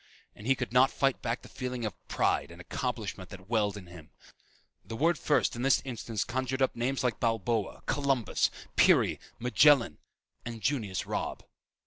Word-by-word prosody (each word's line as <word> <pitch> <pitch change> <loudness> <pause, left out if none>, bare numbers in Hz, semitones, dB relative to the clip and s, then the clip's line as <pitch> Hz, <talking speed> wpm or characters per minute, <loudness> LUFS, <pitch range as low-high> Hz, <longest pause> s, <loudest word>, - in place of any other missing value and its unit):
And 105 - -9
he 135 - +4
could 125 -2 -4
not 130 +1 +6
fight 135 -1 0
back 120 0 -2
the - - -11
feeling 125 -2 -4
of 105 - -3
pride - - +1
and 85 +1 -12
accomplishment 105 -2 -4
that 95 -1 -11
welled 105 -3 +1
in 95 - -9
him. 85 -3 -13 0.7
The 115 - -7
word 165 +8 +3
"first" 145 - +2
in 120 - -4
this 135 +1 +4
instance 115 -4 -3
conjured 130 +4 -2
up 130 - 0
names 130 +3 -1
like 125 -3 0
Balboa, 115 -2 -1
Columbus, 135 -4 +1 0.3
Peary, - - +4 0.2
Magellan 125 - +4 0.4
and 120 -1 -6
Junius 110 -10 -1
Robb. - - -4
120 Hz, 165 wpm, -30 LUFS, 105-130 Hz, 0.7 s, not